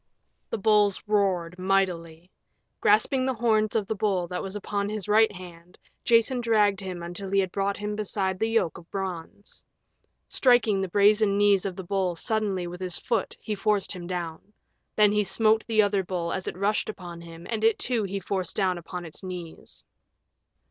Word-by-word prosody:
The - - -2
bulls 210 -1 +3
roared 185 -4 0
mightily. 180 -3 -1 0.5
Grasping 225 +5 +3
the 260 - 0
horns 220 -2 +1
of 215 -3 +1
the 220 - -2
bull 195 -4 0
that 180 - -3
was 195 +1 -6
upon 205 0 -2
his 210 -2 -4
right 220 +1 +5
hand, 180 -2 -12 0.3
Jason 235 +2 +3
dragged 210 -4 +3
him 180 -3 -6
until 175 +3 -6
he 195 +1 +2
had 190 -2 0
brought 200 +1 -1
him 210 0 -3
beside 190 -3 -2
the 220 - +1
yoke 225 -9 0
of 170 - -18
bronze. 190 0 -6 0.6
Striking 240 -6 +3
the 190 - -1
brazen 205 +1 +4
knees 200 -1 +3
of 185 - -5
the 190 - -6
bull 185 -1 -1
suddenly 205 -2 -1
with 175 +1 -8
his 180 -2 -1
foot 235 - -2
he 215 - -4
forced 205 0 0
him 180 -3 -6
down. 170 -3 -4 0.5
Then 210 -1 +5
he 210 0 +2
smote 220 +3 +2
the 220 -2 +4
other 200 -1 +1
bull 175 -2 -3
as 190 - -4
it - - -4
rushed 205 +3 0
upon 175 -5 -8
him, 165 0 -11
and 220 -2 -3
it 225 0 +4
too 240 -3 0
he 200 -1 -3
forced 190 -1 -3
down 185 -3 +1
upon 175 +1 -7
its 160 - -10
knees. 180 -3 -8
195 Hz, 185 wpm, -26 LUFS, 180-215 Hz, 0.6 s, right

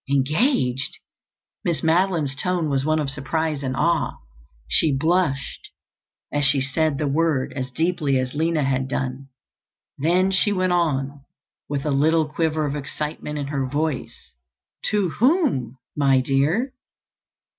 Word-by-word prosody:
"Engaged!" 140 - +1 0.7
Miss 165 -4 -1
Madeline's 165 -4 +2
tone 170 0 -1
was 135 -1 +1
one 155 +2 +2
of 145 -3 -1
surprise 150 +2 -2
and 130 -1 -2
awe. 170 +1 +1 0.5
She 155 - +3
blushed 160 -2 0 0.6
as 145 0 +1
she 135 0 +4
said 140 +2 0
the 150 0 -1
word 145 -2 +1
as 130 -2 -4
deeply 150 -1 0
as 130 0 -2
Lina 160 0 +1
had 135 -1 0
done. 130 0 -3 0.7
Then 180 +6 +2
she 195 +3 +2
went 185 -2 +1
on, 140 -5 0 0.5
with 145 -1 -2
a 150 - +1
little 155 +3 +3
quiver 155 0 0
of 145 0 -2
excitement 150 +1 -4
in 145 - -2
her 135 -3 -1
voice, 145 0 -3 0.6
"To 205 -4 +1
whom, 245 - +2 0.2
my 135 -2 +4
dear?" 145 - +1
150 Hz, 135 wpm, -23 LUFS, 135-165 Hz, 0.7 s, she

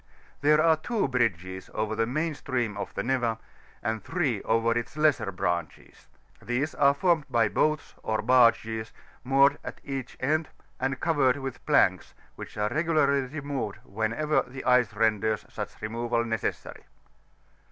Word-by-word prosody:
There 150 +1 +5
are 160 0 +4
two 210 +5 -1
bridges 95 -8 -1
over 110 0 -1
the 115 +1 0
main 155 +6 -1
stream 125 -7 -2
of - - -5
the 100 - -2
Neva, 120 -3 0 0.5
and 110 -2 -2
three 140 - -1
over 115 +1 +1
its 120 +5 -3
lesser 150 -9 +2
branches; 85 -2 -4 0.3
these 130 +5 -1
are 140 0 +4
formed 165 -1 +2
of 115 -3 +2
boats, 155 -1 0
or 110 -1 -1
baizes, 115 -2 +3 0.3
moored 135 +2 +4
at - - -7
each 135 -3 -5
end, 155 +4 0 0.3
and 130 0 -1
covered 145 -6 +2
with 135 -2 -6
planks, - - +2 0.2
which - - -9
are 105 0 0
regularly 145 -3 +2
removed 135 -7 -4
whenever 115 +9 0
the 130 +2 -9
ice 125 -3 +4
renders 110 -1 +1
such - - -7
removal 115 +1 -1
necessary 115 -2 -4
125 Hz, 145 wpm, -27 LUFS, 110-145 Hz, 0.5 s, There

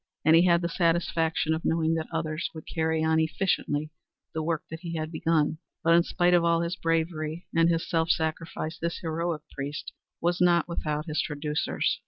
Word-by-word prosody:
And 160 +1 +7
he 170 +2 +6
had 170 0 +4
the - - +1
satisfaction 165 -2 +1
of 160 - -3
knowing 165 0 +1
that 160 -1 -2
others 160 0 -2
would 160 - -8
carry 160 -1 0
on 160 0 +3
efficiently 160 -2 0 0.4
the 160 - -2
work 160 +1 -1
that 160 - -5
he 170 -1 -5
had 155 0 -3
begun. 160 -1 +1 0.2
But 165 +1 +5
in 170 - +7
spite 175 +1 +2
of 175 -1 +5
all 170 0 +3
his 170 +1 -2
bravery 165 -1 -1
and 165 0 +5
his 165 -1 0
self 165 -1 +1
sacrifice 160 0 -2
this 170 0 -2
heroic 165 -1 -2
priest 145 +2 -5 0.3
was 175 +1 0
not 175 -2 +4
without 150 -3 -2
his 155 -2 0
traducers. 150 0 -1
165 Hz, 190 wpm, -27 LUFS, 155-170 Hz, 0.4 s, And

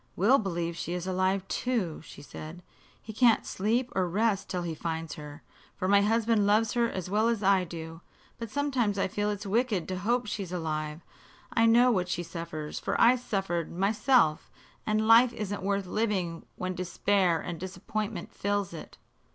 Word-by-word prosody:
"Will 230 +10 +4
believes 170 -4 -3
she 175 - -3
is 180 0 -3
alive, 185 +1 0
too," 225 -11 -2
she 145 - -12
said. 160 +4 -9 0.4
"He 220 - -9
can't 230 0 +4
sleep 235 +6 -1
or 185 -2 +1
rest 205 +2 0
till 180 -1 -2
he 170 -1 -3
finds 160 0 -4
her, 150 0 -10 0.3
for 185 - -2
my 200 +1 +5
husband 220 0 +2
loves 215 +1 +3
her 235 -1 +2
as 185 -5 -5
well 210 +4 +2
as 230 -3 0
I 190 -1 +4
do. 165 -1 -8 0.4
But 230 -1 -5
sometimes 255 -6 0
I 195 - +1
feel 205 +1 -1
it's 205 0 -4
wicked 210 -3 0
to 185 -1 -3
hope 240 +5 0
she 210 0 -4
is 185 -3 -6
alive. 155 -2 -3 0.5
I 230 0 +4
know 240 +2 +6
what 180 -5 0
she 175 -1 -2
suffers, 165 -2 -6
for - - -2
I 240 +2 +7
suffered, 195 -9 -2
myself; 205 - +2 0.4
and 215 0 +1
life 235 +2 +7
isn't 205 -3 -4
worth 200 0 -1
living 185 -5 -2
when 185 0 -3
despair 180 0 +1
and 170 -1 -6
disappointment 200 +1 -5
fills 205 -2 -1
it." 160 - -10
195 Hz, 180 wpm, -28 LUFS, 175-220 Hz, 0.5 s, I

